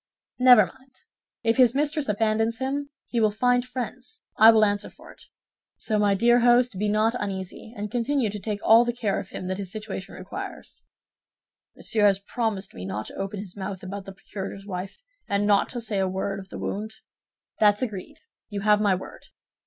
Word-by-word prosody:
"Never 250 Hz, -5 st, +8 dB
mind; 260 Hz, +4 st, -17 dB, 0.5 s
if 225 Hz, +1 st, +2 dB
his 250 Hz, -1 st, +5 dB
mistress 295 Hz, -1 st, 0 dB
abandons 220 Hz, +2 st, +1 dB
him, 280 Hz, +2 st, -2 dB, 0.2 s
he 235 Hz, -, -2 dB
will 215 Hz, -, +4 dB
find 245 Hz, +3 st, +2 dB
friends, 255 Hz, -, -7 dB
I 220 Hz, -, +8 dB
will 220 Hz, -1 st, +6 dB
answer 205 Hz, 0 st, -1 dB
for -, -, -15 dB
it. -, -, -18 dB, 0.5 s
So, 215 Hz, -2 st, -1 dB
my 205 Hz, -1 st, +3 dB
dear 240 Hz, +4 st, +4 dB
host, 240 Hz, -3 st, +4 dB
be 210 Hz, 0 st, +1 dB
not 215 Hz, +2 st, +2 dB
uneasy, 195 Hz, +1 st, -5 dB
and 205 Hz, 0 st, -4 dB
continue 245 Hz, -1 st, 0 dB
to 210 Hz, -, -6 dB
take 210 Hz, 0 st, -3 dB
all 225 Hz, +2 st, +7 dB
the 240 Hz, 0 st, -1 dB
care 220 Hz, -4 st, -1 dB
of 200 Hz, -1 st, -8 dB
him -, -, -7 dB
that 185 Hz, +1 st, -3 dB
his 190 Hz, -2 st, -5 dB
situation 210 Hz, -3 st, -6 dB
requires." -, -, -8 dB, 0.9 s
"Monsieur 210 Hz, -2 st, +2 dB
has 195 Hz, -1 st, +3 dB
promised 205 Hz, -1 st, -3 dB
me 90 Hz, -, -8 dB
not 95 Hz, +3 st, -4 dB
to -, -, -10 dB
open 195 Hz, +1 st, -4 dB
his 190 Hz, -3 st, -9 dB
mouth 190 Hz, -1 st, -6 dB
about 195 Hz, +1 st, -6 dB
the 195 Hz, -, -8 dB
procurator's 195 Hz, 0 st, -8 dB
wife, 185 Hz, -1 st, -6 dB, 0.3 s
and 200 Hz, 0 st, +1 dB
not 205 Hz, -1 st, +3 dB
to 245 Hz, -, -5 dB
say 220 Hz, -3 st, -2 dB
a 190 Hz, -, +1 dB
word 195 Hz, +1 st, -3 dB
of 190 Hz, 0 st, -11 dB
the -, -, -7 dB
wound?" 215 Hz, +2 st, -4 dB, 0.6 s
"That's 210 Hz, +2 st, +4 dB
agreed; 205 Hz, -7 st, -6 dB, 0.3 s
you 205 Hz, -2 st, -4 dB
have 210 Hz, 0 st, +4 dB
my 200 Hz, -3 st, +3 dB
word." 185 Hz, -, -10 dB
210 Hz, 195 wpm, -25 LUFS, 195-240 Hz, 0.9 s, Never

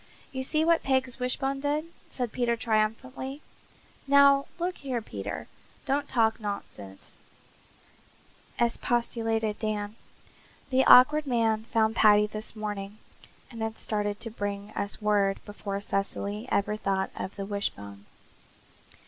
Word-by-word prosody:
"You 260 Hz, -, -3 dB
see 310 Hz, +4 st, +1 dB
what 335 Hz, 0 st, +4 dB
Peg's 260 Hz, -2 st, 0 dB
wishbone 270 Hz, +2 st, -1 dB
did," 290 Hz, +2 st, -1 dB, 0.2 s
said 245 Hz, -4 st, -3 dB
Peter 240 Hz, -1 st, +1 dB
triumphantly. 250 Hz, +6 st, -1 dB, 0.6 s
"Now, 280 Hz, 0 st, +6 dB
look 360 Hz, +1 st, -2 dB
here, 260 Hz, -4 st, -2 dB
Peter, 105 Hz, -, -6 dB, 0.4 s
don't 280 Hz, +2 st, 0 dB
talk 225 Hz, -2 st, +2 dB
nonsense," 105 Hz, -, -7 dB, 1.4 s
expostulated 230 Hz, -2 st, 0 dB
Dan. 210 Hz, -1 st, -2 dB, 0.8 s
"The 260 Hz, +1 st, +4 dB
Awkward 295 Hz, +4 st, +7 dB
Man 225 Hz, -3 st, +1 dB
found 220 Hz, -1 st, +1 dB
Paddy 210 Hz, -2 st, +6 dB
this 215 Hz, +1 st, -6 dB
morning 205 Hz, -1 st, -5 dB, 0.5 s
and 230 Hz, -2 st, -8 dB
had 220 Hz, 0 st, -3 dB
started 205 Hz, -1 st, -2 dB
to 230 Hz, -, -1 dB
bring 205 Hz, -1 st, -4 dB
us 200 Hz, +1 st, +1 dB
word 200 Hz, -2 st, +2 dB
before 205 Hz, -1 st, -5 dB
Cecily 200 Hz, +3 st, -3 dB
ever 205 Hz, +1 st, +1 dB
thought 195 Hz, -2 st, -1 dB
of 190 Hz, -, -5 dB
the 195 Hz, -, -4 dB
wishbone. 100 Hz, -, -5 dB
220 Hz, 125 wpm, -28 LUFS, 205-255 Hz, 1.4 s, Awkward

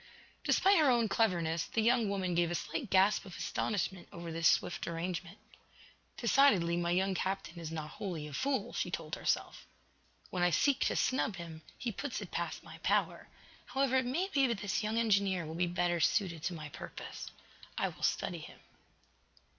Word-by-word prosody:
Despite 390 Hz, -2 st, +4 dB
her 300 Hz, -3 st, +5 dB
own 235 Hz, -3 st, +3 dB
cleverness, 175 Hz, -6 st, +1 dB
the 225 Hz, -, 0 dB
young 235 Hz, -2 st, +3 dB
woman 190 Hz, -3 st, -1 dB
gave 170 Hz, 0 st, +2 dB
a 175 Hz, -, -1 dB
slight 190 Hz, +6 st, -3 dB
gasp 195 Hz, +2 st, +4 dB
of 190 Hz, -3 st, -10 dB
astonishment 190 Hz, -3 st, -2 dB
over 170 Hz, -1 st, -7 dB
this 165 Hz, 0 st, +2 dB
swift 175 Hz, -, +1 dB
arrangement. 170 Hz, +1 st, -4 dB, 0.8 s
"Decidedly, 230 Hz, -9 st, +4 dB
my 170 Hz, 0 st, 0 dB
young 190 Hz, +2 st, +2 dB
captain 190 Hz, -2 st, -3 dB
is 165 Hz, -2 st, -5 dB
not 155 Hz, -2 st, -5 dB
wholly, 175 Hz, -7 st, -3 dB
a 150 Hz, -, -9 dB
fool," 265 Hz, -, -1 dB
she -, -, -1 dB
told 165 Hz, -3 st, -5 dB
herself. -, -, -1 dB, 0.6 s
"When 180 Hz, -, -2 dB
I 175 Hz, -, +5 dB
seek 270 Hz, -, +3 dB
to -, -, +1 dB
snub 255 Hz, -5 st, +1 dB
him, 165 Hz, -2 st, -8 dB, 0.2 s
he 240 Hz, -, -2 dB
puts 270 Hz, +5 st, -4 dB
it -, -, -8 dB
past -, -, -3 dB
my -, -, -11 dB
power. -, -, 0 dB, 0.4 s
However, 270 Hz, -1 st, +1 dB
it 260 Hz, -, +2 dB
may 335 Hz, +10 st, 0 dB
be 275 Hz, -2 st, +4 dB
that 235 Hz, -3 st, -1 dB
this 205 Hz, +1 st, 0 dB
young 215 Hz, +1 st, -1 dB
engineer 200 Hz, -6 st, +2 dB
will 155 Hz, -, -6 dB
be 175 Hz, +2 st, +1 dB
better 175 Hz, 0 st, 0 dB
suited 170 Hz, -1 st, +1 dB
to 175 Hz, -, -1 dB
my 155 Hz, -2 st, -7 dB
purpose. -, -, -8 dB, 0.5 s
I -, -, +1 dB
will -, -, -14 dB
study -, -, 0 dB
him." -, -, -11 dB
190 Hz, 185 wpm, -33 LUFS, 170-230 Hz, 0.8 s, her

